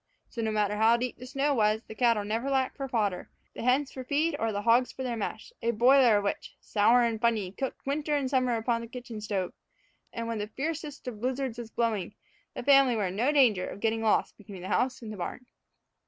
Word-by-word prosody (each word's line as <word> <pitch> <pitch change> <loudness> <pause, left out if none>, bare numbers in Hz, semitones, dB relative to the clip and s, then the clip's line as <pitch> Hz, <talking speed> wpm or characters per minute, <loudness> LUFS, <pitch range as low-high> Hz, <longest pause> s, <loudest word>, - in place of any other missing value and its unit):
So, 235 - -5
no 220 - 0
matter 210 -1 0
how 225 +2 +5
deep 245 0 -4
the 250 - -9
snow 280 +3 0
was, 215 -2 +2
the - - -10
cattle 230 -2 +2
never 225 +6 -2
lacked 265 -1 0
for 275 -2 -4
fodder, 210 -7 -1 0.2
the - - -7
hens 260 +3 +2
for 260 - -7
feed, 295 +4 0
or 225 0 0
the 205 0 -3
hogs 240 +3 +4
for 260 - -6
their 245 -2 -2
mash, 215 0 -5
a 230 - 0
boiler 240 0 +5
of 205 - -1
which, 200 - -3
sour 230 +4 +3
and 225 -2 -1
fumy, 215 -5 0
cooked 265 -2 -5
winter 295 +2 -1
and 280 -2 0
summer 255 -3 +1
upon 230 +1 0
the 230 - -7
kitchen 240 -3 -8
stove; 200 -4 -2 0.6
and, 230 0 -4
when 230 -2 -3
the 205 - -3
fiercest 295 +3 -5
of 220 -4 -6
blizzards 255 -1 -2
was 235 -2 -7
blowing, 225 -6 -1 0.4
the - - -5
family 275 -3 +5
were 210 -3 0
in 180 - -6
no 245 +8 +2
danger 240 -11 +3
of - - -8
getting 225 +1 0
lost 220 -1 +1
between 195 -3 -10
the 185 - -6
house 255 -1 0
and 215 -1 -6
the - - -9
barn. 220 +7 -5
235 Hz, 230 wpm, -28 LUFS, 215-260 Hz, 0.6 s, how